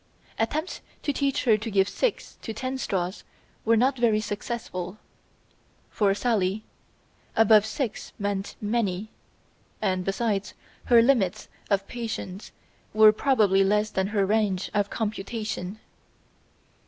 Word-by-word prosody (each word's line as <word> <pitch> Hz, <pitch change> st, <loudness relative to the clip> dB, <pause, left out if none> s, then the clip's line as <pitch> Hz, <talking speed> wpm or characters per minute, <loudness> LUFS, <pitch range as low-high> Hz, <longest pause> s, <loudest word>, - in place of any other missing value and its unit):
Attempts 305 Hz, +10 st, -2 dB, 0.2 s
to 290 Hz, -, 0 dB
teach 275 Hz, -1 st, 0 dB
her 220 Hz, -3 st, +4 dB
to 220 Hz, +2 st, -4 dB
give 195 Hz, -2 st, +3 dB
six -, -, -2 dB
to 225 Hz, -, -5 dB
ten 260 Hz, +4 st, -4 dB
straws 185 Hz, -5 st, -2 dB, 0.4 s
were 230 Hz, 0 st, +4 dB
not 255 Hz, +2 st, +2 dB
very 225 Hz, -3 st, +3 dB
successful. 205 Hz, -3 st, -5 dB, 0.9 s
For 200 Hz, -2 st, +2 dB
Sally 210 Hz, -3 st, 0 dB, 0.7 s
"above 220 Hz, -1 st, +6 dB
six" 225 Hz, 0 st, -4 dB
meant 200 Hz, -1 st, -3 dB
"many," 210 Hz, -2 st, -1 dB, 0.7 s
and 185 Hz, -3 st, 0 dB
besides, 195 Hz, 0 st, -1 dB, 0.3 s
her 235 Hz, -2 st, +6 dB
limits 215 Hz, -6 st, +1 dB, 0.2 s
of 195 Hz, -1 st, +1 dB
patience 220 Hz, -5 st, -5 dB, 0.4 s
were 215 Hz, 0 st, +8 dB
probably 210 Hz, -5 st, +3 dB
less 210 Hz, +2 st, +1 dB
than 190 Hz, 0 st, 0 dB
her 200 Hz, -1 st, +1 dB
range 200 Hz, -2 st, 0 dB
of 205 Hz, -1 st, +1 dB
computation. 215 Hz, -2 st, -4 dB
215 Hz, 120 wpm, -26 LUFS, 195-230 Hz, 0.9 s, were